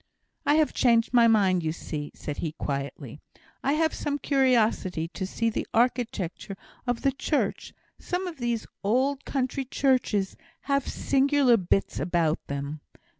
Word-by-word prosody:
"I 290 - +5
have 310 -1 +3
changed 235 -1 +3
my 235 -1 +6
mind, 195 -5 +4
you 160 -1 -1
see," 150 -2 -5
said 145 - -6
he, 155 -2 -3
quietly. 140 -2 -5 0.4
"I 275 - +2
have 315 +1 +2
some 290 -1 -2
curiosity 230 - +2
to 190 +2 -4
see 230 +4 -1
the - - -3
architecture 225 -6 0 0.3
of 245 -1 -1
the 275 - +4
church; 290 +2 -1 0.3
some 360 +1 -3
of 345 -3 -6
these 240 -3 -2 0.2
old 260 +7 +1
country 270 0 -1
churches 250 -7 +1 0.3
have 275 -2 0
singular 275 -2 +3
bits 195 -1 0
about 170 -3 +1
them. 140 +2 -4
230 Hz, 145 wpm, -27 LUFS, 175-275 Hz, 0.4 s, my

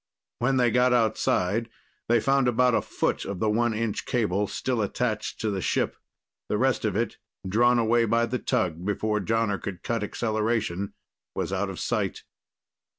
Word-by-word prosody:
When 130 +2 +2
they 120 -2 +3
got 125 +2 +4
outside, 110 -2 +1 0.4
they 120 0 +5
found 135 +2 +2
about 125 +1 +3
a - - +3
foot - - -1
of 100 -2 -5
the 110 +2 +1
one 115 +1 +1
inch 110 -1 -2
cable 105 -4 +1
still 125 +1 -1
attached 110 +1 -2
to 110 - 0
the 95 -2 -2
ship. - - 0 0.5
The 105 - +1
rest 130 -1 +1
of 105 -3 0
it, 115 +2 -1 0.3
drawn 120 +5 +4
away 115 0 +3
by 115 +1 +2
the 125 +2 -2
tug 85 -5 -1
before 105 +2 0
Jonner 110 -2 0
could 95 -3 -6
cut 115 -2 -1
acceleration, 110 -3 -1 0.4
was - - -2
out - - -1
of - - -6
sight. - - -1
115 Hz, 170 wpm, -26 LUFS, 105-120 Hz, 0.5 s, they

